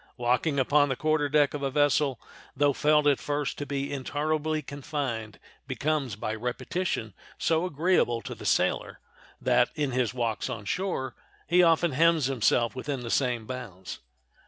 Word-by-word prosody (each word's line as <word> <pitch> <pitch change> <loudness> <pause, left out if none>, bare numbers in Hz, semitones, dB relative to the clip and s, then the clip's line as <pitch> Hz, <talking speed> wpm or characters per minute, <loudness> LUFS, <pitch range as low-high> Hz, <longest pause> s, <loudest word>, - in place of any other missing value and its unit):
Walking 125 +5 +1
upon 145 +2 +3
the 130 - 0
quarter 155 0 +1
deck 145 -1 +3
of 145 - -4
a 140 - 0
vessel, 145 -2 +2 0.4
though 145 0 +3
felt 150 +2 +3
at 145 -2 +4
first 145 -1 -2
to 145 - -4
be 140 +1 -3
intolerably 155 +3 -1
confined, 135 -5 -4 0.3
becomes, 145 -6 -1
by 110 +1 -3
repetition, 120 - -3 0.2
so 165 +2 +1
agreeable 155 -7 +2
to - - -6
the - - -11
sailor - - 0 0.4
that, 125 -1 +3
in 145 -3 -1
his 125 -2 0
walks 120 -3 -2
on 105 -3 -5
shore, 155 - -2 0.3
he 180 +1 +4
often 170 -1 +4
hems 165 +1 +3
himself 120 -2 +1
within 135 0 -3
the 115 -1 -5
same 125 -4 0
bounds. 110 -8 -7
140 Hz, 160 wpm, -27 LUFS, 125-150 Hz, 0.4 s, at